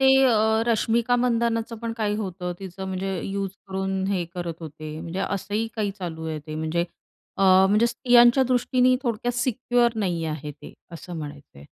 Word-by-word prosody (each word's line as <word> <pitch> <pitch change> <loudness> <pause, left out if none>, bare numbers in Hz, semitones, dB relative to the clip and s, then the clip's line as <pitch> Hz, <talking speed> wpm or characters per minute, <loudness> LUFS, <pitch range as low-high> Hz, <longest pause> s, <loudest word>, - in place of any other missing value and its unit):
ते 265 - +5 0.2
अ, 220 -2 +3
रश्मिका 235 +1 +2
मंदानाचं 230 -1 0
पण 230 0 -4
काही 210 -2 0
होतं, 185 -4 -4
तिचं 190 0 -7
म्हणजे 190 -1 -3
यूज 195 -1 -2 0.2
करून 190 0 -2
हे 190 -3 0
करत 175 -2 -4
होते. 155 -1 -7
म्हणजे 170 +3 -5
असंही 205 +3 -2
काही 205 -2 0
चालू 160 -3 -5
आहे 155 -1 -3
ते 155 - -6
म्हणजे 160 +2 -1 0.5
अ, - - 0 0.3
म्हणजे 210 +4 +4
स्त्रियांच्या 240 +1 +5
दृष्टीने 255 0 +3
थोडक्यात 240 -1 -1
सिक्युअर 245 -1 +1
नाही 175 -6 -1
आहे 155 -2 -4
ते, 145 - -12 0.2
असं 175 +1 -8
म्हणायचंय. 145 - -9
200 Hz, 165 wpm, -25 LUFS, 170-235 Hz, 0.5 s, ते